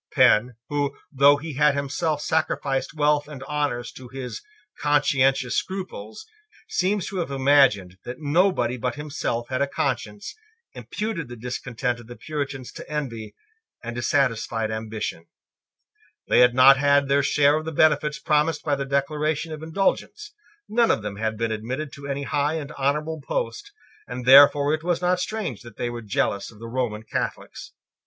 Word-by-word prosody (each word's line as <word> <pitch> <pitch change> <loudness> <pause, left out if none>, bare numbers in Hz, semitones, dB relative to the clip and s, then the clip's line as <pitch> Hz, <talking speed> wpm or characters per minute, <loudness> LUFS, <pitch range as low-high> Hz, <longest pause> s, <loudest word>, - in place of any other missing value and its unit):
Penn, 120 +3 +4
who, 145 -1 -1 0.2
though 140 +1 +6
he 155 +1 -7
had 145 +1 +3
himself 145 +2 -1
sacrificed 145 -3 -1
wealth 150 -1 +2
and 140 -3 -9
honours 140 -4 -2
to 130 - -11
his 130 0 -7 0.4
conscientious 135 -3 +2
scruples, 190 - -5 0.4
seems 205 - 0
to 195 - -5
have 170 -4 -2
imagined 130 -10 +3
that 125 +1 -7
nobody 150 -5 +1
but 125 +2 -2
himself 145 -5 -3
had 130 +1 -1
a 140 - +2
conscience, 110 -7 -3 0.4
imputed 210 - -4
the 120 - -8
discontent 125 +1 -3
of 120 - -13
the 120 - -9
Puritans 140 -4 -5
to - - -10
envy 115 -8 -4 0.5
and 120 0 -5
dissatisfied 115 -3 0
ambition. 110 -6 -5 1.0
They - - +4
had 125 0 +5
not 135 +2 +8
had 140 0 +3
their 140 +1 +3
share 145 +1 +3
of 155 - -5
the 160 - -3
benefits 150 -1 +2
promised 150 0 +1
by 150 - 0
the 140 0 -3
Declaration 150 +3 -1
of 155 - -8
Indulgence: 195 - -2 0.3
none 235 +1 +2
of 110 - +1
them 100 -1 -5
had 110 0 -2
been 115 0 -1
admitted 130 +7 -4
to 140 0 -9
any 140 0 -3
high 145 +2 0
and 150 -3 -5
honourable 150 +3 -1
post; 420 - -4 0.4
and 125 0 -6
therefore 140 +2 +7
it 155 0 -2
was 175 -1 0
not 180 0 +1
strange 185 - -3
that 120 -3 -13
they 120 - -2
were 120 0 -6
jealous 100 -2 -1
of 110 - -17
the 115 - -10
Roman 115 -3 -2
Catholics. 110 - -5
140 Hz, 165 wpm, -24 LUFS, 120-150 Hz, 1.0 s, not